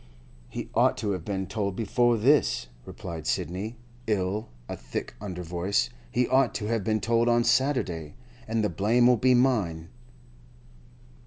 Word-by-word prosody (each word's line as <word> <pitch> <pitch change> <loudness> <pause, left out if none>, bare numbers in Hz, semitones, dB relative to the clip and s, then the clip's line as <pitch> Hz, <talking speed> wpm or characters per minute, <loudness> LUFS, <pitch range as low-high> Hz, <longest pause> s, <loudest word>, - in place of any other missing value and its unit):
'He - - -5
ought - - +3
to 105 -1 -1
have 90 -4 -3
been 95 0 -3
told 100 0 -2
before 120 +2 +2
this,' 130 - +3 0.2
replied 80 -2 -7
Sidney, 100 +9 -2 0.3
in 100 0 0 0.2
a - - -4
thick - - -6
under 90 -4 -5
voice. 95 +8 0 0.2
'He 125 0 +1
ought 135 +1 +3
to 105 - -3
have 115 -1 -1
been 110 +2 +1
told 115 +2 +2
on 120 0 +3
Saturday. 120 - 0 0.3
And 110 0 0
the 105 - +1
blame'll 120 +7 +3
be 130 +3 +4
mine. 100 -11 +1
105 Hz, 150 wpm, -27 LUFS, 90-120 Hz, 0.3 s, be